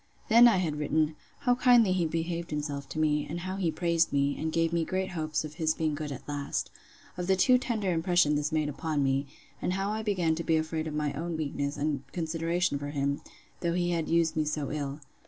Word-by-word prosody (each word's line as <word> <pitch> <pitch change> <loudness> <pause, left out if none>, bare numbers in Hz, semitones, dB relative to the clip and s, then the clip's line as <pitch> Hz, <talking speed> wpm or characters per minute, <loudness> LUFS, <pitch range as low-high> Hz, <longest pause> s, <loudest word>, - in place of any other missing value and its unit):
Then 235 +2 +8
I 225 -5 +4
had 160 -5 -1
written, 155 +1 +1 0.3
'How 250 -3 +3
kindly 245 -5 +5
he 175 -3 +1
behaved 165 +1 -3
himself 145 -2 -4
to - - -7
me; 150 -1 +1
and 170 +3 -4
how 185 +2 -4
he 180 -4 +1
praised 170 0 +1
me, 140 0 +1
and 160 +1 -2
gave 165 0 +1
me 170 -1 +2
great 185 +2 -2
hopes 155 -2 -2
of 150 - -8
his 155 0 +2
being 155 -2 0
good 150 0 -4
at 135 - -8
last. 145 -1 -3 0.5
Of 180 0 -3
the 190 - +4
too 250 +7 +5
tender 220 -7 -1
impression 170 -2 +3
this 150 +1 0
made 155 -1 +1
upon 150 0 -1
me; 135 +1 +1 0.3
and 180 - 0
how 195 +2 -1
I 215 +1 -2
began 185 -7 +1
to 165 +1 -3
be 160 -1 +2
afraid 160 0 -2
of 150 - -4
my 150 -1 -1
own 165 +3 -3
weakness 145 -2 -2
and 145 -2 -1
consideration 165 -1 0
for 145 0 -5
him, 140 0 -1 0.4
though 170 -1 0
he 175 0 0
had 165 -2 -1
used 165 -1 +2
me 155 - +2
so 150 -2 -2
ill. 145 0 -4
160 Hz, 230 wpm, -29 LUFS, 150-175 Hz, 0.5 s, Then